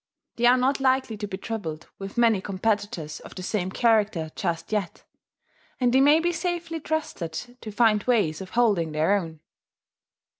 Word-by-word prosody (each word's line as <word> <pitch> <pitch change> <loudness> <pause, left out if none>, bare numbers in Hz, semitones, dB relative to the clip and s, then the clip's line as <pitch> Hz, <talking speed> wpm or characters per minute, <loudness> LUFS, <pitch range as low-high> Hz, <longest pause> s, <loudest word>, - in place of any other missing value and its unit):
They 240 0 +4
are 250 +1 +6
not 265 +3 +1
likely 260 -3 +1
to 205 0 -4
be 190 -1 -5
troubled 170 -7 -5
with 195 +2 -7
many 230 -5 +4
competitors 195 -6 -2
of - - -12
the 185 - -6
same 185 -1 -1
character 210 -7 +1
just 165 +3 -3
yet; 205 -5 -2 0.8
and 245 -1 +2
they 265 - +5
may 295 +3 +6
be 345 +1 +1
safely 345 -1 -3
trusted 300 - -3 0.3
to 215 - -7
find 215 -1 +3
ways 200 -10 +1
of 190 - -8
holding 195 -10 +2
their 160 +6 +2
own." 165 -5 -4
210 Hz, 165 wpm, -25 LUFS, 185-250 Hz, 0.8 s, are